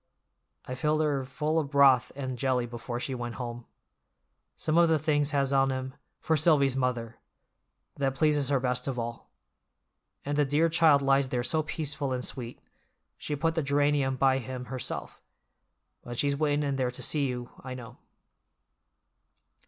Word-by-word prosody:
I 125 - -5
filled 155 +4 +1
her 145 -3 0
full 150 +4 -1
of 145 -3 -3
broth 140 -3 +5
and 130 -2 -4
jelly 125 0 0
before 120 0 -5
she 130 - -3
went 120 -2 -5
home. 120 -1 -6 0.9
Some 155 - -1
of 170 0 +5
the 160 - +4
things 145 -1 +1
has 140 -2 +1
on 135 0 +3
'em 130 0 -4 0.3
'For 160 - +1
Silvy's 145 -4 +3
mother'—that 125 +2 -5
pleases 150 -2 +2
her 140 -2 +2
best 125 0 -1
of 135 -2 -2
all. 115 0 -5 1.0
And 145 +1 -1
the - - +5
dear 150 +4 +2
child 160 -4 +4
lies 135 -1 +3
there 125 -1 -1
so 155 +6 +1
peaceful 150 -3 -3
and 125 0 -2
sweet—She 125 +4 -8
put 165 +3 0
the 165 - 0
geranium 140 -1 +1
by 135 0 +3
him 125 0 -6
herself. 130 - -5 0.8
But 120 0 -8
she's 140 +1 +1
waitin' 150 0 +1
in 140 -1 -1
there 130 -2 0
to 125 - -6
see 145 -3 +1
you, 125 -1 -5
I 130 -1 -6
know." 120 -3 -10
135 Hz, 160 wpm, -28 LUFS, 125-150 Hz, 1.0 s, broth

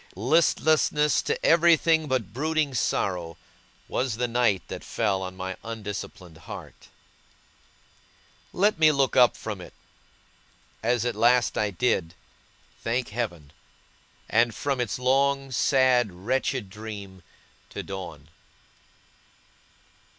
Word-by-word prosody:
Listlessness 150 - +2
to - - -2
everything, 165 -1 +4
but 125 -7 -2
brooding 155 +1 0
sorrow, 90 - -1 0.5
was 125 -3 -1
the 125 0 0
night 115 -6 +1
that - - -7
fell 95 -1 -1
on 95 0 -6
my 95 0 -4
undisciplined 100 -6 -7
heart. - - -10 1.6
Let 205 -1 +2
me 155 -1 +6
look 140 -2 +1
up 125 -2 +5
from 105 -4 -6
it 90 - -12 1.1
as 120 +1 +1
at 120 - 0
last 120 +2 +3
I 105 - +1
did, 90 -4 -1 0.7
thank 120 +2 -1
Heaven! 90 -11 -5 0.7
and 115 -1 +2
from 140 -3 -1
its 120 - -2
long, 135 +2 +1
sad, 130 -4 +3
wretched 115 +3 -2
dream, 100 -3 -8 0.5
to - - -6
dawn. 85 -6 -8
120 Hz, 110 wpm, -26 LUFS, 95-135 Hz, 1.6 s, me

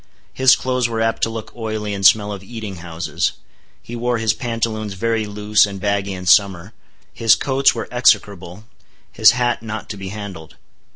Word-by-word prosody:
His 130 -1 +5
clothes 125 -2 -1
were 115 -1 -3
apt 115 0 0
to - - +1
look 115 -1 -8
oily 110 -3 -4
and 100 -1 -5
smell 105 +2 +5
of 100 -2 -6
eating 105 -2 -8
houses. 85 0 -3 0.5
He 120 - -8
wore 120 0 -1
his 110 -1 +1
pantaloons 110 -4 -3
very 110 +2 -1
loose 105 0 +2
and 100 -1 -7
baggy 100 0 -1
in 90 -1 -7
summer. 95 +1 +3 0.4
His 115 -2 +4
coats 135 -1 +2
were 115 - -5
execrable; 100 -5 +1 0.5
his - - +5
hat 120 -1 -1
not 110 -1 -7
to 105 - -7
be 95 -1 -7
handled. 95 -6 -9
110 Hz, 175 wpm, -19 LUFS, 100-115 Hz, 0.5 s, His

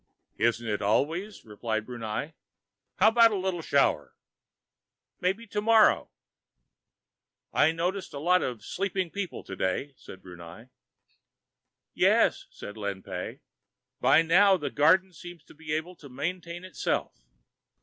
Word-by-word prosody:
"Isn't 115 0 +1
it 105 -1 -2
always?" 160 - -1
replied 110 0 -3
Brunei. 120 +5 -5 0.6
"How 215 - +5
about 230 0 +6
a 215 - -2
little 185 -2 -2
shower?" 135 - +1 1.0
"Maybe 195 +6 -1
tomorrow." 215 +1 +3 1.4
"I 155 - +4
notice 180 +4 -3
a - - -7
lot 180 +5 +3
of 120 -5 -4
sleeping 190 -2 -2
people 200 -4 -5
today," 95 +9 -3
said 95 - -13
Brunei. 90 +6 -12 1.2
"Yes," - - +2
said 105 - -10
Lin 100 -2 -4
Pey. 90 -2 -6 0.6
"By 160 - +5
now, 190 +4 +5
the 150 - -4
garden 185 +6 +3
seems 175 0 -11
to - - -17
be 155 0 -9
able 160 +4 -3
to 140 - -13
maintain 170 +6 -5
itself." 185 - -2
160 Hz, 125 wpm, -27 LUFS, 110-185 Hz, 1.4 s, about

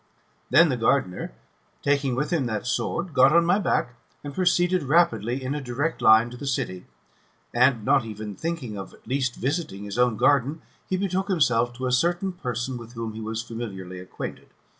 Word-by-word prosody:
Then 170 -1 +6
the 130 - 0
gardener, 115 -5 0 0.5
taking 140 -3 +1
with 150 +6 -2
him 140 -7 +1
that 110 -3 -3
sword, 170 +6 -2
got 135 +1 +6
on 170 0 +5
my 180 +4 +3
back, 125 -10 0 0.3
and 145 -1 -6
proceeded 180 0 +2
rapidly 130 - +2
in 130 +2 -2
a 150 - -3
direct 135 +6 -2
line 110 +2 +6
to 125 - -9
the 140 - -6
city; 95 -8 -3 0.7
and, 120 -3 +3
not 135 -1 +4
even 110 -1 -6
thinking 130 - -4
of 95 - -9
at - - -25
least 130 0 -1
visiting 135 - -3
his 105 +3 -5
own 125 -3 +3
garden, 145 +4 +2 0.3
he 185 - +1
betook 190 0 -1
himself 125 -9 +2
to 130 +1 -5
a 125 - 0
certain 175 +8 +1
person 125 -5 -4
with 115 0 -11
whom 115 -2 -5
he 110 - -7
was 110 +1 -3
familiarly 95 -6 -7
acquainted. 90 - -7
130 Hz, 185 wpm, -25 LUFS, 115-155 Hz, 0.7 s, Then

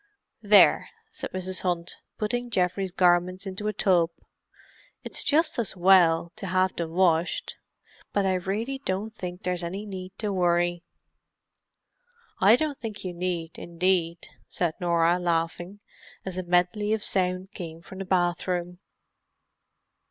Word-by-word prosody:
"There!" 205 -1 +5 0.2
said 455 - -5
Mrs. 185 0 -1
Hunt, 175 -2 -2 0.2
putting 240 +3 -2
Geoffrey's 185 -2 0
garments 180 +2 +2
into 195 +2 -4
a - - +1
tub. 180 -4 +3 0.9
"It's - - -1
just 310 0 +2
as 210 -4 -3
well 175 -2 +5
to 195 - -6
have 185 +1 +1
them 170 -1 -3
washed, 175 - +1 0.5
but 200 -1 +1
I 190 - +2
really 205 +9 -2
don't 200 +2 -3
think 180 -3 -7
there's 180 -1 -1
any 190 +5 -5
need 190 -2 -8
to 210 -2 -2
worry." 175 -1 +1 1.6
"I 200 +4 +7
don't 290 +1 -2
think 215 -4 -6
you 180 - -3
need, 170 -2 -4
indeed!" 170 -1 -1 0.2
said 170 -3 -1
Norah, 170 0 +2
laughing, 175 +3 -2 0.4
as 190 -2 -4
a 185 - -2
medley 180 +4 +1
of 220 -1 -1
sound 185 0 -1
came 165 -3 -8
from 190 - -11
the 195 - -4
bathroom. 180 -1 -1
185 Hz, 135 wpm, -26 LUFS, 175-200 Hz, 1.6 s, I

